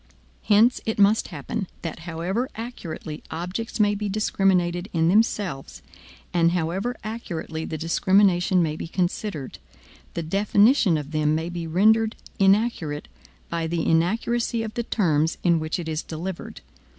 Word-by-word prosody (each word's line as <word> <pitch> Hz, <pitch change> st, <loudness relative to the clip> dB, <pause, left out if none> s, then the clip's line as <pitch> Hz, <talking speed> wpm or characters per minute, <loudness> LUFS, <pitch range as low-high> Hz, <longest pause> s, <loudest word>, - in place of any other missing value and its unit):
Hence 220 Hz, +4 st, +4 dB
it 220 Hz, -, -2 dB
must 205 Hz, +2 st, +4 dB
happen 180 Hz, +6 st, -4 dB, 0.2 s
that 165 Hz, -1 st, -5 dB
however 185 Hz, +10 st, -2 dB
accurately 175 Hz, -9 st, -6 dB
objects 180 Hz, +9 st, -4 dB
may 205 Hz, -1 st, +4 dB
be 205 Hz, 0 st, -3 dB
discriminated 190 Hz, -3 st, +1 dB
in 165 Hz, -1 st, +2 dB
themselves, 185 Hz, -, 0 dB, 0.5 s
and 170 Hz, -1 st, +3 dB
however 180 Hz, +8 st, -1 dB
accurately 170 Hz, -8 st, -5 dB
the 160 Hz, -, -4 dB
discrimination 180 Hz, +2 st, +3 dB
may 155 Hz, -2 st, -1 dB
be 160 Hz, -, -6 dB
considered, 175 Hz, -4 st, -3 dB, 0.6 s
the 170 Hz, -, -2 dB
definition 200 Hz, -, +3 dB
of 145 Hz, 0 st, -6 dB
them 155 Hz, -1 st, +1 dB
may 160 Hz, +2 st, -2 dB
be 170 Hz, -1 st, -5 dB
rendered 220 Hz, +6 st, +3 dB, 0.2 s
inaccurate 195 Hz, -7 st, +2 dB, 0.4 s
by 165 Hz, -1 st, -2 dB
the 165 Hz, 0 st, -1 dB
inaccuracy 225 Hz, +7 st, +1 dB
of 220 Hz, -1 st, -5 dB
the 240 Hz, -, -1 dB
terms 160 Hz, -9 st, +1 dB
in 170 Hz, -2 st, +4 dB
which 155 Hz, +2 st, -2 dB
it 170 Hz, -2 st, -5 dB
is 155 Hz, -1 st, -2 dB
delivered. 170 Hz, +3 st, -6 dB
180 Hz, 140 wpm, -24 LUFS, 160-210 Hz, 0.6 s, Hence